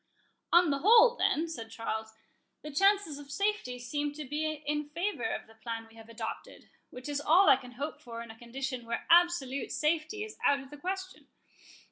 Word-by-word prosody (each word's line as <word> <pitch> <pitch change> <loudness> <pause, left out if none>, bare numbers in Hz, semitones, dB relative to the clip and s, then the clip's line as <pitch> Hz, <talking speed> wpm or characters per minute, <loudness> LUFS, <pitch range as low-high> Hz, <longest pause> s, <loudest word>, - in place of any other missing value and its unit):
"On 345 -2 +6
the 280 - 0
whole, 460 - +7
then," 330 -7 +1
said 230 -9 -7
Charles, 220 -1 -4 0.5
"the 300 - -6
chances 390 -2 +2
of 285 -1 -12
safety 395 -6 -1
seem 290 +4 -3
to 300 0 -7
be 305 +3 -1
in 295 0 -2
favour 335 - -2
of - - -4
the 225 - -18
plan 225 0 -6
we 225 - -20
have 225 0 -14
adopted, 225 -1 -7 0.2
which 250 +2 -9
is 290 -1 -2
all 355 +7 +5
I - - +9
can 250 -1 -10
hope 290 +4 -5
for 235 -4 -7
in 230 - -10
a - - -13
condition 255 0 -5
where 235 - -3
absolute 335 -7 +3
safety 320 +7 0
is 430 - -9
out 285 0 +4
of 270 0 -12
the 295 - -9
question. 375 +4 -5
290 Hz, 195 wpm, -30 LUFS, 245-340 Hz, 0.5 s, I